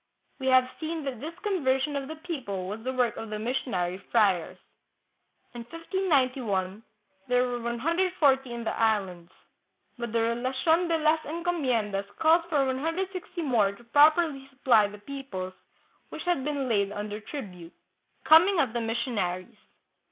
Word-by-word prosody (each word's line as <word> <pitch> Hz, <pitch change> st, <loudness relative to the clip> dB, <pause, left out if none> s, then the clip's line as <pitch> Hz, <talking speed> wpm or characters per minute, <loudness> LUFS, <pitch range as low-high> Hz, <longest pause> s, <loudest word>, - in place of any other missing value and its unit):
We 265 Hz, -, -3 dB
have 255 Hz, -1 st, +5 dB
seen 320 Hz, 0 st, -3 dB
that 265 Hz, -4 st, -4 dB
this 320 Hz, +6 st, -7 dB
conversion 290 Hz, -8 st, 0 dB
of 275 Hz, -1 st, -3 dB
the 315 Hz, -, -6 dB
people 265 Hz, -, -5 dB
was 210 Hz, +3 st, -5 dB
the 260 Hz, -, -2 dB
work 250 Hz, -2 st, 0 dB
of 225 Hz, -, -6 dB
the 215 Hz, -, -3 dB
missionary 210 Hz, -6 st, -2 dB
friars. 195 Hz, -8 st, +1 dB, 1.0 s
In 240 Hz, -, -7 dB
1591 255 Hz, -, -1 dB, 0.5 s
there 250 Hz, 0 st, +2 dB
were 245 Hz, -1 st, -3 dB
140 275 Hz, +1 st, +1 dB
in 235 Hz, 0 st, -5 dB
the 220 Hz, -, -2 dB
Islands, 190 Hz, -6 st, 0 dB, 0.7 s
but 235 Hz, -2 st, -4 dB
the 230 Hz, 0 st, +1 dB
Relation 260 Hz, +9 st, +1 dB
de 335 Hz, -1 st, +2 dB
las 310 Hz, 0 st, +3 dB
Enco 340 Hz, +3 st, -2 dB
miendas 220 Hz, -, -1 dB
calls 325 Hz, +2 st, +4 dB
for 290 Hz, -4 st, +2 dB
160 340 Hz, +6 st, -3 dB
more 225 Hz, -8 st, +2 dB
to 240 Hz, -, -16 dB
properly 290 Hz, +2 st, +4 dB
supply 255 Hz, -6 st, +3 dB
the 205 Hz, +1 st, -10 dB
peoples 205 Hz, -6 st, -6 dB, 0.6 s
which -, -, -7 dB
had 350 Hz, -7 st, 0 dB
been 285 Hz, -2 st, -2 dB
laid 200 Hz, -4 st, +1 dB
under 210 Hz, 0 st, -5 dB
tribute. 190 Hz, -, -8 dB, 0.5 s
Coming 340 Hz, +4 st, +6 dB
of 245 Hz, -7 st, +1 dB
the 235 Hz, -, -1 dB
Missionaries. 225 Hz, -4 st, -2 dB
255 Hz, 150 wpm, -27 LUFS, 215-310 Hz, 1.0 s, Coming